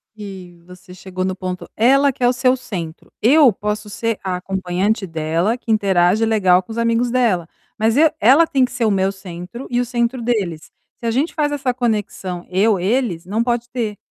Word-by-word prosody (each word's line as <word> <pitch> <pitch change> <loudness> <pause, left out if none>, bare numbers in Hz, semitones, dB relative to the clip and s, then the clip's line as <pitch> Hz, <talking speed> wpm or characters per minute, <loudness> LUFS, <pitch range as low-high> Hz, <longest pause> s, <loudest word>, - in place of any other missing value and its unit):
que 190 -4 -10
você 180 0 -14
chegou 185 0 -6
no 185 0 -2
ponto, 185 -1 -6
ela 275 +5 +4
que 255 -1 -7
é - - +5
o 245 - +3
seu 255 +1 +2
centro. 170 -9 -7
Eu 275 +2 +6
posso 210 +1 -4
ser 230 +1 -2
a 185 -2 -2
acompanhante 190 +3 -1
dela 165 +6 -1
que 235 -2 -4
interage 195 0 +3
legal 190 -5 +3
com 205 - -12
os 220 - -6
amigos 230 +1 +1
dela, 225 -9 +1 0.3
mas 220 +1 +1
eu 315 +1 +6
ela 275 +10 +5
tem 265 -4 +2
que - - -10
ser 245 -3 -1
o 215 - +2
meu 190 -1 +1
centro 190 +5 -9
e 245 0 0
o 245 - 0
centro 240 +1 -1
deles. 200 -10 -2 0.3
Se - - -8
a 230 - +1
gente 275 +8 0
faz 295 -2 0
essa 275 -3 -1
conexão 205 -7 -3
eu-eles 195 0 +1
não 210 +5 -1
pode 240 0 -1
ter, 225 -4 -3
215 Hz, 200 wpm, -19 LUFS, 185-245 Hz, 0.3 s, Eu